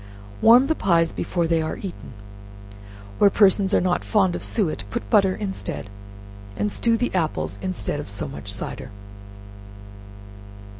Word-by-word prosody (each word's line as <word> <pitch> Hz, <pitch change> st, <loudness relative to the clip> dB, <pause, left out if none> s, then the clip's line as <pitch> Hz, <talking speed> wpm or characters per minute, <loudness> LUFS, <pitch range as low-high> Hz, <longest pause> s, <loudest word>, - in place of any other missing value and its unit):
Warm 240 Hz, +4 st, +7 dB
the 315 Hz, -, +1 dB
pies 170 Hz, -, +1 dB
before 175 Hz, -2 st, -1 dB
they 165 Hz, 0 st, +1 dB
are 155 Hz, -, -3 dB
eaten. 185 Hz, -9 st, -8 dB, 1.1 s
Where 200 Hz, -, +6 dB
persons 195 Hz, -1 st, +3 dB
are -, -, +4 dB
not 180 Hz, 0 st, 0 dB
fond 195 Hz, -5 st, +2 dB
of -, -, -5 dB
suet, 160 Hz, -, -1 dB
put 100 Hz, 0 st, -4 dB
butter 190 Hz, -2 st, +4 dB
instead, 195 Hz, -, -5 dB, 0.7 s
and 105 Hz, 0 st, -1 dB
stew 230 Hz, -1 st, +2 dB
the 245 Hz, -, -2 dB
apples 165 Hz, -4 st, -2 dB
instead 185 Hz, -5 st, -3 dB
of 145 Hz, -, -7 dB
so 100 Hz, -, -4 dB
much -, -, -7 dB
cider. -, -, -6 dB
185 Hz, 145 wpm, -23 LUFS, 160-205 Hz, 1.1 s, Warm